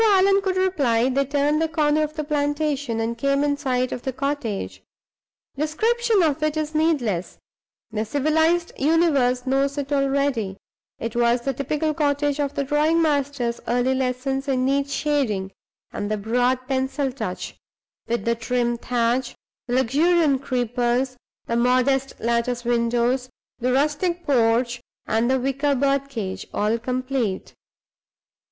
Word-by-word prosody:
Before 440 -2 +5
Allan 390 +1 +4
could 380 -1 -1
reply, 275 -11 +2
they 275 +1 +1
turned 290 +2 +1
the 325 - +2
corner 310 -1 +1
of 305 0 -2
the 305 - -2
plantation, 290 -4 -1
and 225 +1 -1
came 275 +4 +1
in 290 -1 +1
sight 255 -3 -1
of 250 - -4
the 265 - -3
cottage. 270 -6 -3 0.7
Description 435 - +1
of 305 -1 +1
it 310 0 0
is 310 0 -2
needless; 275 - 0 0.5
the 215 0 -1
civilized 320 +7 +1
universe 280 -5 +2
knows 275 +2 +1
it 285 0 -2
already. 275 -8 0 0.4
It 230 0 -5
was 240 0 +2
the 270 +2 -1
typical 300 +4 -1
cottage 290 -1 0
of 285 -1 -1
the 280 - 0
drawing 300 +4 +2
master's 285 -6 0
early 245 +2 +2
lessons 265 +1 -2
in 255 -2 +1
neat 275 +1 +1
shading 255 -11 -1 0.4
and 205 - -3
the 215 - 0
broad 245 +4 0
pencil 265 +1 -1
touch 220 -8 -5 0.5
with 235 -3 -2
the 235 - +2
trim 240 0 -1
thatch, 240 +1 0 0.3
the 245 - -1
luxuriant 285 +3 +3
creepers, 245 0 0 0.3
the 235 - -2
modest 255 +3 +1
lattice 235 +1 -1
windows, 240 +2 +1 0.3
the 250 +1 0
rustic 305 +6 0
porch, 240 -2 +2 0.2
and 225 +2 +1
the 265 0 +2
wicker 275 +2 0
bird 275 +1 +1
cage, 205 -8 -5
all 215 +3 +1
complete. 255 -4 -2
270 Hz, 145 wpm, -23 LUFS, 240-295 Hz, 0.7 s, Before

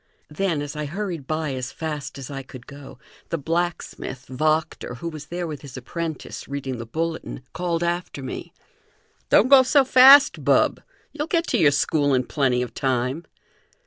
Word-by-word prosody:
Then, 160 -2 -1
as 145 +1 -7
I 150 0 -3
hurried 170 -3 -5
by 155 -2 -2
as 130 0 -4
fast 150 -4 -5
as 135 0 -8
I 135 -1 -5
could 130 -2 -12
go, 140 0 -12 0.3
the 165 - -1
blacksmith, 165 -4 -3
Wachter, 155 -1 -1
who 145 +8 -6
was 155 -2 -9
there, 175 0 -4
with 155 -3 -6
his 135 -3 -10
apprentice, 160 +5 -6
reading 135 -2 -4
the 115 - -7
bulletin, 160 -1 -4
called 175 -2 -1
after 170 -5 -3
me: 130 - -6 0.8
"Don't 225 - +5
go 270 0 +8
so 270 +1 +4
fast, 270 +3 +7
bub; - - +3 0.3
you'll 300 0 -4
get 335 0 +1
to - - +1
your 150 - +6
school 145 -1 +1
in 130 - +1
plenty 125 -2 0
of 125 - -7
time!" 130 +4 -1
155 Hz, 175 wpm, -23 LUFS, 135-175 Hz, 0.8 s, go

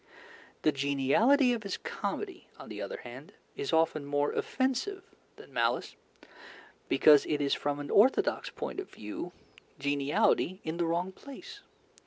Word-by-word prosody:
The 155 - +4
geniality 145 - +3
of 235 - -3
his 200 -2 -4
comedy, 380 -4 -5
on - - -11
the - - -6
other - - -5
hand, - - -10 0.2
is 415 0 -3
often 160 -2 +2
more 145 +1 0
offensive 270 +10 -1 0.3
than - - -15
malice, - - 0 0.9
because 150 -2 +6
it 150 - 0
is 140 -1 +1
from 145 0 -1
an 145 - -5
orthodox 245 +6 +3
point - - -5
of 390 - -6
view 105 +11 -7 0.5
geniality 145 +5 +1
in 160 +1 -3
the 170 - +1
wrong 175 +3 -1
place. 315 - -11
170 Hz, 145 wpm, -30 LUFS, -, 0.9 s, because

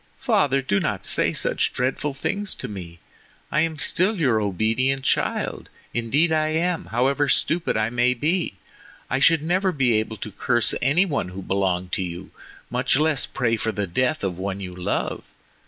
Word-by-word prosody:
father! 135 -1 +2
do 100 -6 +1
not - - -2
say - - +3
such - - 0
dreadful 130 +3 -1
things 200 +9 -3
to - - -6
me. 90 -5 -8 0.5
I 155 - +2
am 160 -1 -1
still 185 +8 +1
your 125 -9 +2
obedient 115 +7 0
child. - - -1 0.2
Indeed, 135 +8 +2
I 155 -1 +2
am. 165 +2 0
However 135 +4 +1
stupid 165 -7 +1
I 110 +1 0
may 120 +1 +2
be, 160 - 0 0.6
I 135 - +1
should 160 +2 +4
never 185 +3 +1
be 130 -7 +2
able 110 0 -4
to 105 - -7
curse 120 +4 +2
any 145 +9 +3
one 145 - -2
who 95 +1 -8
belonged 95 -2 -1
to 105 - -1
you, 90 +1 -7 0.4
much - - +2
less 155 -2 +2
pray 115 -4 0
for 110 +1 -1
the 105 -1 -2
death 130 - 0
of 90 -2 -2
one 95 0 -3
you 90 -2 -6
love. 90 0 -2
125 Hz, 175 wpm, -23 LUFS, 100-155 Hz, 0.6 s, should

